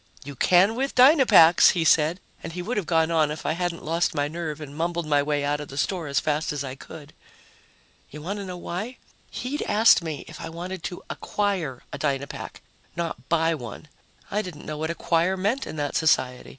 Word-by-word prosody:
"You 140 +1 -8
can 185 - +4
with 270 +4 -2
Dynapacks," 255 - +7
he 175 -3 0
said, 160 +3 +3 0.2
and 165 - -7
he 180 0 -5
would 235 +7 -3
have 200 -6 -2
gone 160 -1 +2
on 155 -2 +3
if 150 +1 -6
I - - +1
hadn't 170 +1 -3
lost 165 +2 0
my 145 -1 0
nerve 160 -1 -5
and 145 -2 -9
mumbled 170 +1 -2
my 145 -1 +2
way 145 0 -1
out 145 +1 0
of 150 - -7
the 135 - -10
store 170 +2 -1
as 140 -1 +1
fast 155 +2 -1
as 145 -1 -3
I 130 -2 -5
could. 150 +2 -12 1.0
You 150 +1 -10
want 200 +5 -4
to 200 - -5
know 180 -1 -6
why? 205 +9 -5 0.3
He'd 275 +4 -4
asked 220 -1 +5
me 155 -3 -5
if - - -10
I 165 - -6
wanted 175 +2 -6
to 180 - -6
"acquire" 185 -11 -2
a - - -5
Dynapack, 140 -2 -4 0.3
not 165 -6 -5
buy 165 0 +2
one. 145 +1 -8 0.4
I 210 - +1
didn't 175 -7 -9
know 150 -1 -5
what 160 +1 -2
"acquire" 170 +2 +1
meant 210 +8 -1
in - - -6
that 145 -2 -3
society. 130 -5 +1
165 Hz, 210 wpm, -25 LUFS, 150-180 Hz, 1.0 s, Dynapacks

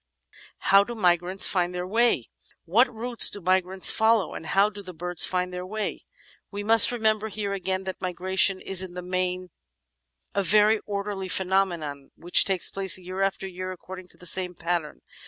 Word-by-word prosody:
How 195 +1 +4
do 240 +3 -8
Migrants 180 -1 +1
Find 180 -2 -1
their 180 0 -4
Way? 225 - +1 0.4
What 235 +9 +3
routes 235 +1 +3
do 205 - -5
migrants 185 +1 +2
follow, 220 -4 +1
and 160 - -8
how 195 +6 +2
do 205 0 -10
the 185 -3 -11
birds 175 +1 +1
find 180 0 -2
their 180 0 -5
way? 215 +3 -5 0.4
We 205 0 -6
must 225 +2 +7
remember 220 -2 0
here, 205 -2 -4
again, 190 -1 -3
that 190 0 -7
migration 185 +1 +1
is 190 -1 0
in 185 -2 -8
the 180 - -6
main 185 0 -3 0.8
a 200 - 0
very 210 +3 +3
orderly 200 -1 -4
phenomenon 180 -7 -2
which 175 +1 +4
takes 190 -3 +2
place 195 -1 0
year 185 +1 -7
after 195 0 -2
year 185 0 -7
according 185 0 -10
to - - -17
the 180 - -11
same 180 0 0
pattern. 170 -3 -4
190 Hz, 175 wpm, -25 LUFS, 180-205 Hz, 0.8 s, must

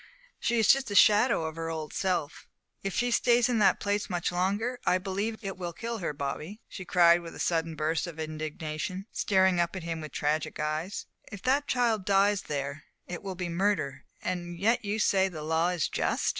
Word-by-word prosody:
"She 235 - +1
is 220 -2 +3
just 270 0 +5
the 205 - -4
shadow 210 -1 +5
of 160 -1 -4
her 165 0 -3
old 160 -2 -5
self; 180 -6 -2 0.3
if 195 - -2
she 245 0 +1
stays 240 0 +4
in 240 -3 +1
that 205 - +4
place 205 +1 -1
much 175 -2 -1
longer, 205 +8 -1
I 180 - +3
believe 200 +4 -3
it 195 -2 -4
will 175 -2 -4
kill 230 +5 -4
her. 170 - -2
Bobby," 150 +8 -5
she 185 - -8
cried, 175 -1 +5
with 165 -1 -9
a - - -10
sudden 165 -1 0
burst 155 +3 -1
of 165 -2 -8
indignation, 155 +3 -4
staring 190 -3 +3
up 170 +2 0
at 185 - -5
him 165 -1 -4
with 155 - -7
tragic 150 +1 -1
eyes, 155 +5 -2 0.3
"if 200 -2 -8
that 280 +3 +2
child 235 -5 +1
dies 200 +1 +3
there, 140 0 -4 0.2
it 175 - -6
will 195 -2 -5
be 180 -1 -3
murder! 175 -5 0 0.2
And 175 -1 -3
yet 225 +6 +2
you 205 +1 -1
say 195 -3 +3
the 155 -4 -7
law 160 +2 +1
is 180 -3 0
just!" - - 0
180 Hz, 205 wpm, -29 LUFS, 160-205 Hz, 0.3 s, just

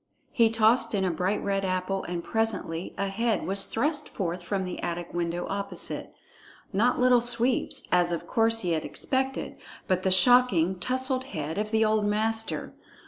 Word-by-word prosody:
He 230 -2 +3
tossed 225 +1 +2
in 190 -1 0
a 180 - 0
bright 185 +5 -1
red 195 -1 -1
apple, 185 +1 -2
and 175 -1 -4
presently 200 -7 -1
a 200 - -1
head 225 +3 -1
was 195 +1 +2
thrust 295 +5 -1
forth 175 -2 -4
from 190 +2 -3
the 180 - -6
attic 175 0 -5
window 175 0 -2
opposite. 200 0 -3 0.6
Not 235 +7 +2
Little 250 -1 +4
Sweep's, 240 +1 +2
as 175 -1 +3
of 170 - -3
course 225 -1 +2
he 180 - -2
had 160 -1 -1
expected, 265 0 -2 0.3
but 185 -1 +1
the 190 - 0
shocking, 190 -3 +4
tousled 260 +3 -1
head 160 - -5
of 210 0 -2
the 220 0 +2
old 215 0 +1
master. 220 +2 -1
200 Hz, 170 wpm, -26 LUFS, 180-230 Hz, 0.6 s, Little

